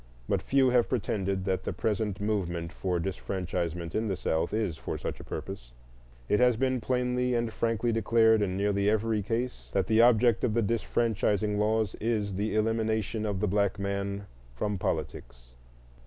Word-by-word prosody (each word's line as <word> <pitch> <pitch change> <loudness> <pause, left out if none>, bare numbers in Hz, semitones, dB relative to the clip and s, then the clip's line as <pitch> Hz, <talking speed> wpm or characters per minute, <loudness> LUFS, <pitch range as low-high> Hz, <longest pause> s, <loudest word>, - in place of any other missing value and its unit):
But - - +1
few 135 -2 +3
have 120 -1 +3
pretended 100 -5 -1
that 95 -2 -1
the - - -3
present 105 -2 -1
movement 90 -5 -2
for 90 -2 -1
disfranchisement 85 -2 -3
in 110 +1 0
the 95 - -1
South 80 -1 -1
is 105 -6 -1
for - - -5
such - - -5
a - - -9
purpose; - - -7 0.5
it 105 - +2
has 125 -2 +4
been 130 0 0
plainly 125 0 0
and 115 -1 -1
frankly 115 0 0
declared 110 -1 +4
in 95 -2 -1
nearly 100 0 +1
every 110 0 +1
case 115 +5 -3
that 95 - +2
the 110 0 +4
object 120 -1 +4
of 110 -3 +1
the 115 - +2
disfranchising 105 -1 0
laws 110 0 +1
is 105 -3 0
the 105 +3 -1
elimination 110 0 0
of 100 -2 -2
the 105 - +2
black 100 0 +1
man 100 0 -3 0.3
from 100 +8 -2
politics. - - -4
105 Hz, 170 wpm, -29 LUFS, 95-115 Hz, 0.5 s, has